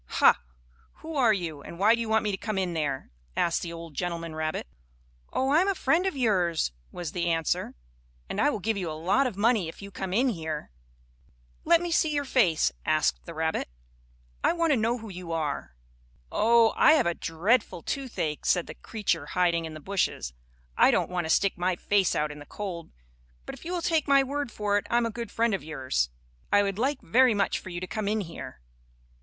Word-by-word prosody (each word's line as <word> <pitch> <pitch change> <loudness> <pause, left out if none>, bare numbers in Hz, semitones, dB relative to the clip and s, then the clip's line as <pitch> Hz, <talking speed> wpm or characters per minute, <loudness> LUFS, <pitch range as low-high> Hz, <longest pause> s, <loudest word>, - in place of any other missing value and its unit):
"Ha! - - +6 0.6
Who 320 0 -6
are 250 -5 +4
you, 170 -8 -2
and 170 - -10
why 210 +5 +5
do 235 - 0
you 225 - -3
want 220 0 +3
me 210 - 0
to - - -1
come 215 0 -3
in 185 -2 0
there?" 145 - -2 0.3
asked 170 - +1
the 170 - -5
old 165 -1 -8
gentleman 170 0 -3
rabbit. 155 0 -2 0.7
"Oh, 265 - 0
I 305 +4 +5
am 380 - +1
a 395 - +1
friend 355 +2 +2
of 375 - -2
yours," 180 - +1 0.2
was 175 -4 -5
the 175 -1 -2
answer, 165 -1 0 0.5
"and - - -2
I 290 - +4
will 255 - -1
give 215 +2 -1
you 180 -4 -2
a 155 - -5
lot 195 - +2
of 220 -6 -6
money 215 -4 +3
if 160 - -9
you 200 0 -9
come 190 0 -5
in 250 +7 +3
here." 160 - -4 0.9
"Let 335 +1 +5
me 350 -1 -3
see 320 -1 +3
your 285 -1 0
face," 195 - +3
asked 155 +2 +1
the 170 - -7
rabbit, 160 - -1 0.7
"I - - +4
want 335 -2 +1
to - - +5
know 230 +1 +1
who 225 -2 -9
you 180 -3 -6
are." 150 - -3 0.6
"Oh! 230 +1 +4
I 310 - +6
have 310 - +3
a 170 - +1
dreadful 175 +3 0
toothache," 230 - -3
said 175 -2 +2
the - - -8
creature 180 -9 -2
hiding 170 -1 +1
in 160 -1 -7
the - - -7
bushes. 185 - -1 0.4
"I - - +6
don't - - +1
want 175 -2 -1
to - - -4
stick 195 +2 +2
my 180 0 +1
face 195 0 +1
out 150 0 0
in 150 - -9
the 145 - -12
cold. 180 -5 -6 0.6
But - - -6
if - - -12
you 345 - -4
will 350 -2 -2
take 320 -3 +1
my 275 -1 +5
word 280 -1 -3
for 205 -1 +1
it - - -11
I 235 - +3
am 240 - +2
a 230 - -2
good 235 -1 -5
friend 230 -1 +1
of 195 - -2
yours. 130 - -1 0.4
I 205 - +5
would 200 0 -2
like 270 +3 0
very 245 +5 +4
much 200 -1 +1
for - - -10
you 175 -1 -4
to 185 - -4
come 215 +2 -3
in 215 +1 +1
here." 165 - -8
195 Hz, 225 wpm, -27 LUFS, 165-235 Hz, 0.9 s, Ha